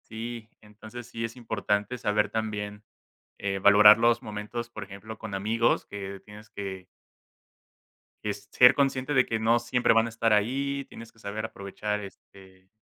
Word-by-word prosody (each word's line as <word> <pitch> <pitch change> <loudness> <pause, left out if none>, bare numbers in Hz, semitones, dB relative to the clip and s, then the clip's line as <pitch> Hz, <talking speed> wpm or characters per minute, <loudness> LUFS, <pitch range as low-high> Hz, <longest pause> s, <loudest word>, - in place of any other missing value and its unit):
Sí. 115 0 -7
Entonces, 110 +3 -11
sí 115 -1 -6
es 115 +1 -4
importante, 110 -1 -2
saber 105 -2 +1
también, 105 -1 -4 0.5
eh, 95 -1 -2
valorar 105 +2 +8
los 120 0 +3
momentos, 105 +3 -6
por - - -7
ejemplo, 105 +3 -10
con 110 -2 -8
amigos, 110 +4 +1
que 100 -1 -7
tienes 105 +1 -13
que 95 -2 -7 1.4
que, 105 - 0
ser 105 +5 +5
consciente, 135 0 0
de 125 - +5
que 110 - -2
no 115 +2 +3
siempre 120 0 +2
van 115 0 +4
a - - -4
estar 115 0 0
ahí. 135 +6 0
Tienes 115 0 -11
que - - -30
saber 110 0 -5
aprovechar, 105 0 -4
este 95 -1 -14
110 Hz, 160 wpm, -27 LUFS, 105-115 Hz, 1.4 s, valorar